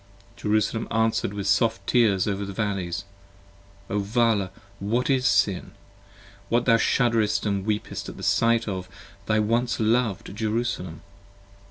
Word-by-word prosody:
Jerusalem 110 Hz, 0 st, 0 dB
answer'd 110 Hz, -2 st, +1 dB
with 100 Hz, -1 st, -5 dB
soft 115 Hz, +3 st, +2 dB
tears 105 Hz, -7 st, +3 dB
over 100 Hz, -1 st, -1 dB
the 100 Hz, 0 st, -6 dB
valleys. 95 Hz, -4 st, -2 dB, 0.8 s
Vala 105 Hz, 0 st, +1 dB, 0.3 s
what 115 Hz, +7 st, 0 dB
is 130 Hz, -1 st, +2 dB
Sin? 100 Hz, -2 st, +1 dB, 0.8 s
that 120 Hz, +1 st, +2 dB
thou 115 Hz, -2 st, +5 dB
shudderest 115 Hz, -3 st, +2 dB
and 100 Hz, -1 st, -1 dB
weepest 105 Hz, -1 st, -3 dB
At -, -, -7 dB
sight 115 Hz, 0 st, +2 dB
of 95 Hz, -2 st, -4 dB, 0.4 s
thy 110 Hz, -, +2 dB
once 115 Hz, +3 st, +1 dB
lov'd 110 Hz, -3 st, 0 dB
Jerusalem! 110 Hz, -7 st, -2 dB
110 Hz, 125 wpm, -25 LUFS, 100-115 Hz, 0.8 s, thou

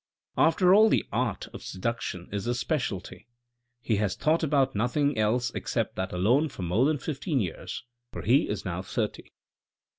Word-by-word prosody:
" -, -, -39 dB
After 180 Hz, +2 st, +4 dB
all 215 Hz, +2 st, +7 dB
the -, -, +2 dB
art -, -, -1 dB
of -, -, -8 dB
seduction 95 Hz, -2 st, -4 dB
is 100 Hz, -1 st, -3 dB
his 120 Hz, 0 st, -1 dB
speciality. 120 Hz, -, -3 dB, 0.6 s
He 110 Hz, -3 st, +1 dB
has 100 Hz, -2 st, 0 dB
thought 155 Hz, +9 st, +2 dB
about 140 Hz, -4 st, +2 dB
nothing 130 Hz, +7 st, +1 dB
else 115 Hz, +4 st, +1 dB
except -, -, -2 dB
that 95 Hz, -, -3 dB
alone 120 Hz, -, +2 dB
for 95 Hz, -, -7 dB
more 95 Hz, +9 st, +2 dB
than 155 Hz, +1 st, +2 dB
fifteen 145 Hz, +1 st, -2 dB
years, 90 Hz, +1 st, -4 dB, 0.3 s
for -, -, -6 dB
he 130 Hz, +6 st, +3 dB
is 105 Hz, -2 st, -3 dB
now 90 Hz, 0 st, -3 dB
thirty. 95 Hz, -, -4 dB
120 Hz, 175 wpm, -27 LUFS, 100-145 Hz, 0.6 s, all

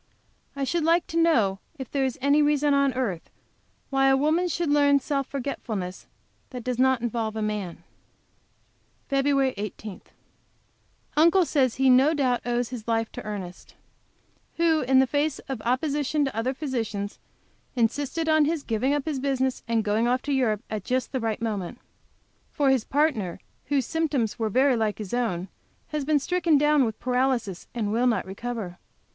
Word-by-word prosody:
I 280 Hz, -, -2 dB
should 330 Hz, +4 st, 0 dB
like 335 Hz, +2 st, +3 dB
to -, -, 0 dB
know 220 Hz, -13 st, +3 dB, 0.2 s
if 265 Hz, -3 st, -7 dB
there 275 Hz, -1 st, 0 dB
is 260 Hz, -2 st, -1 dB
any 285 Hz, +2 st, +4 dB
reason 295 Hz, -1 st, +3 dB
on 280 Hz, -1 st, +3 dB
earth 205 Hz, -10 st, -3 dB, 0.6 s
why 270 Hz, 0 st, +3 dB
a 270 Hz, 0 st, +5 dB
woman 315 Hz, +6 st, +2 dB
should 340 Hz, -2 st, -1 dB
learn 285 Hz, -1 st, +5 dB
self 275 Hz, -1 st, -2 dB
forgetfulness 220 Hz, -9 st, -5 dB, 0.4 s
that 250 Hz, -3 st, -7 dB
does 250 Hz, 0 st, -2 dB
not 260 Hz, -2 st, +3 dB
apply 230 Hz, -1 st, -1 dB
to 220 Hz, -, -8 dB
a -, -, -2 dB
man? 210 Hz, -5 st, -4 dB, 1.3 s
FEB. 275 Hz, -1 st, +2 dB
18. 210 Hz, -1 st, -6 dB, 1.1 s
Uncle 340 Hz, +4 st, +5 dB
says 265 Hz, -6 st, +1 dB
he 270 Hz, -, -1 dB
has 250 Hz, -, +7 dB
no 285 Hz, +5 st, +4 dB
doubt 255 Hz, -4 st, +1 dB
he 245 Hz, -, -4 dB
owes 240 Hz, 0 st, 0 dB
his 240 Hz, -3 st, -7 dB
life 225 Hz, -1 st, 0 dB
to -, -, -8 dB
Ernest, 195 Hz, -4 st, -7 dB, 0.8 s
who, 330 Hz, -2 st, +3 dB
in 260 Hz, +1 st, +3 dB
the 265 Hz, -, +6 dB
face 290 Hz, +2 st, 0 dB
of 265 Hz, -5 st, -4 dB
opposition 285 Hz, +3 st, 0 dB
to 270 Hz, -, -4 dB
other 250 Hz, +4 st, -1 dB
physicians, 225 Hz, -8 st, -3 dB, 0.6 s
insisted 285 Hz, +7 st, 0 dB
on 315 Hz, -1 st, +4 dB
his 315 Hz, -1 st, -1 dB
giving 250 Hz, +5 st, 0 dB
up 290 Hz, -, -2 dB
his 300 Hz, -4 st, -2 dB
business 265 Hz, -1 st, -1 dB
and 230 Hz, -1 st, +1 dB
going 215 Hz, +2 st, +1 dB
off 250 Hz, +1 st, +1 dB
to 285 Hz, -, -1 dB
Europe 225 Hz, -6 st, +1 dB
at 215 Hz, -3 st, -4 dB
just 255 Hz, +3 st, -1 dB
the 265 Hz, -, -1 dB
right 225 Hz, -1 st, -2 dB
moment. 210 Hz, -1 st, -3 dB, 0.7 s
For 280 Hz, -2 st, +2 dB
his 260 Hz, -4 st, +1 dB
partner, 265 Hz, -, 0 dB, 0.3 s
whose 280 Hz, -4 st, 0 dB
symptoms 285 Hz, -10 st, -1 dB
were 220 Hz, -1 st, 0 dB
very 260 Hz, +4 st, +3 dB
like 215 Hz, -3 st, 0 dB
his 210 Hz, -2 st, -7 dB
own, 215 Hz, -7 st, -1 dB, 0.4 s
has 300 Hz, -1 st, -2 dB
been 305 Hz, 0 st, +3 dB
stricken 330 Hz, +1 st, +2 dB
down 295 Hz, -1 st, +4 dB
with 220 Hz, -2 st, -4 dB
paralysis, 250 Hz, -6 st, -1 dB
and 215 Hz, -3 st, -1 dB
will 240 Hz, +3 st, +2 dB
not 235 Hz, -, +1 dB
recover. 195 Hz, -2 st, -6 dB
260 Hz, 175 wpm, -26 LUFS, 225-285 Hz, 1.3 s, has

